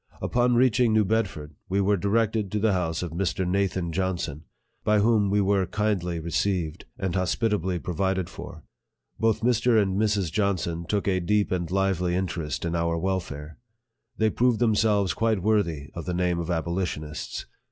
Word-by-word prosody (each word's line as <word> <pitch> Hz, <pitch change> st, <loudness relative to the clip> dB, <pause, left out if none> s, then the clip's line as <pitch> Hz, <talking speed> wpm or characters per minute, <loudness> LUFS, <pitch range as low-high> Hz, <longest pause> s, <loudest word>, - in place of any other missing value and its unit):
Upon 120 Hz, 0 st, +2 dB
reaching 120 Hz, -2 st, +4 dB
New 110 Hz, -1 st, +4 dB
Bedford, 95 Hz, -8 st, -1 dB, 0.2 s
we 95 Hz, +2 st, +1 dB
were 100 Hz, +1 st, +3 dB
directed 105 Hz, +1 st, 0 dB
to 105 Hz, -, +1 dB
the 110 Hz, -1 st, +2 dB
house 85 Hz, -2 st, -1 dB
of 85 Hz, -, -4 dB
Mr. 90 Hz, +1 st, -1 dB
Nathan 95 Hz, -2 st, 0 dB
Johnson, 85 Hz, -5 st, -2 dB, 0.4 s
by 105 Hz, 0 st, +3 dB
whom 105 Hz, -1 st, +3 dB
we 100 Hz, +1 st, +2 dB
were 95 Hz, -1 st, +2 dB
kindly 95 Hz, -5 st, -1 dB
received, 85 Hz, 0 st, -1 dB
and 95 Hz, -3 st, -2 dB
hospitably 95 Hz, 0 st, 0 dB
provided 95 Hz, +1 st, -1 dB
for. -, -, -10 dB, 0.6 s
Both 110 Hz, -1 st, +2 dB
Mr. 120 Hz, -1 st, +3 dB
and 100 Hz, 0 st, +1 dB
Mrs. 105 Hz, -6 st, +1 dB
Johnson 85 Hz, -4 st, -1 dB
took 100 Hz, 0 st, -1 dB
a 95 Hz, -2 st, +2 dB
deep 105 Hz, +4 st, +1 dB
and 85 Hz, -3 st, -1 dB
lively 95 Hz, -2 st, +1 dB
in 95 Hz, +1 st, +1 dB
terest 85 Hz, -4 st, -4 dB
in 85 Hz, -, -1 dB
our 85 Hz, 0 st, 0 dB
welfare. 80 Hz, -4 st, -3 dB, 0.6 s
They 110 Hz, 0 st, +2 dB
proved 125 Hz, -1 st, +2 dB
themselves 105 Hz, -4 st, +2 dB
quite 110 Hz, -5 st, 0 dB
worthy 85 Hz, -9 st, 0 dB
of 85 Hz, -, -6 dB
the 90 Hz, -, -2 dB
name 90 Hz, -1 st, +1 dB
of 85 Hz, 0 st, -4 dB
abolitionists. 80 Hz, -3 st, -3 dB
95 Hz, 165 wpm, -26 LUFS, 85-105 Hz, 0.6 s, reaching